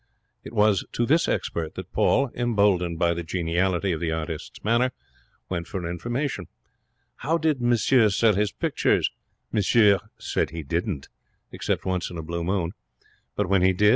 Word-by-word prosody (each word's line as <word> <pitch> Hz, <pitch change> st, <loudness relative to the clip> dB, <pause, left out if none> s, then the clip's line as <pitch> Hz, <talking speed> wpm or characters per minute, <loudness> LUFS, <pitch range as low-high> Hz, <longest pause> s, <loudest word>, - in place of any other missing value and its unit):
It -, -, -9 dB
was 105 Hz, -2 st, +3 dB
to 120 Hz, -, +1 dB
this 160 Hz, +7 st, +3 dB
expert 80 Hz, -2 st, -2 dB
that -, -, -8 dB
Paul, 140 Hz, -3 st, +2 dB
emboldened 100 Hz, -8 st, +1 dB
by 85 Hz, +1 st, +2 dB
the 85 Hz, -, -3 dB
geniality 90 Hz, +3 st, 0 dB
of 80 Hz, -, -2 dB
the 80 Hz, -1 st, -1 dB
artist's 80 Hz, -1 st, -5 dB
manner, 120 Hz, +4 st, +2 dB, 0.5 s
went 85 Hz, -2 st, -3 dB
for 90 Hz, 0 st, -4 dB
information. 120 Hz, -, -3 dB, 0.7 s
How 160 Hz, +5 st, 0 dB
did 155 Hz, -5 st, 0 dB
monsieur 120 Hz, -1 st, +4 dB
sell 110 Hz, +2 st, +3 dB
his 100 Hz, +1 st, +1 dB
pictures? -, -, +1 dB, 0.4 s
Monsieur 105 Hz, -1 st, +4 dB, 0.2 s
said -, -, -1 dB
he 80 Hz, -1 st, -6 dB
didn't, 85 Hz, 0 st, -2 dB, 0.4 s
except -, -, -2 dB
once 90 Hz, -2 st, -1 dB
in 85 Hz, -, -7 dB
a 80 Hz, -, -5 dB
blue 85 Hz, +2 st, -3 dB
moon. 90 Hz, -1 st, 0 dB, 0.6 s
But 105 Hz, -, 0 dB
when 95 Hz, 0 st, +3 dB
he 95 Hz, +1 st, +4 dB
did? 105 Hz, +3 st, +4 dB
95 Hz, 165 wpm, -25 LUFS, 85-115 Hz, 0.7 s, monsieur